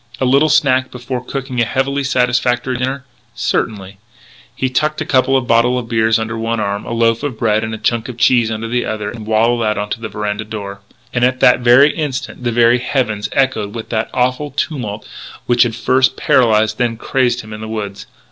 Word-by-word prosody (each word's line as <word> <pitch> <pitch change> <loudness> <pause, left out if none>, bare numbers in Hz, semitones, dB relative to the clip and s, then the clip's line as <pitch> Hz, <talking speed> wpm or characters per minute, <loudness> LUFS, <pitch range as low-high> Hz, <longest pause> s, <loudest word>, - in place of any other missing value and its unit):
A 130 - +1
little 140 +4 +4
snack 130 -4 +3
before 125 0 -5
cooking 130 -1 -3
a - - +4
heavily 135 +4 -1
satisfactory 125 -1 +1
dinner? 130 +2 -3 0.3
Certainly. 100 -3 -2
So 115 +5 -28 0.4
he 130 - -1
tucked 150 +4 0
a - - -2
couple 135 0 +3
of 130 - -2
bottles 120 +2 +3
of 115 - -14
beer 110 -1 +2
under 110 0 -3
one 115 0 -1
arm, 100 -1 -2
a - - -6
loaf 115 0 +1
of 140 -6 -4
bread 110 -1 +1
and 110 - -3
a - - -7
chunk 120 +2 -1
of 120 - -8
cheese 120 -1 +3
under 110 +1 -4
the 120 +1 -1
other, 105 -1 -4
and 110 -2 -9
waddled 115 +2 +2
out 105 -1 -1
to 115 - -3
the 110 - -5
veranda 105 0 -3
door. 100 -2 -7 0.3
And 120 - 0
at 130 +1 +2
that 125 0 +5
instant 135 0 +2
the 120 - 0
very 120 +1 +4
heavens 115 -5 -1
echoed 120 -6 0
with 115 - -6
that 110 -1 -1
awful 130 +4 0
tumult 125 -7 -4 0.4
which 120 0 +2
had 120 -2 +3
first 130 +2 +2
paralysed, 110 -6 +2
then 120 -2 0
crazed 125 0 0
him 110 0 -11
in 105 - -8
the 110 - -6
woods. 105 -2 -5
120 Hz, 205 wpm, -17 LUFS, 110-130 Hz, 0.4 s, that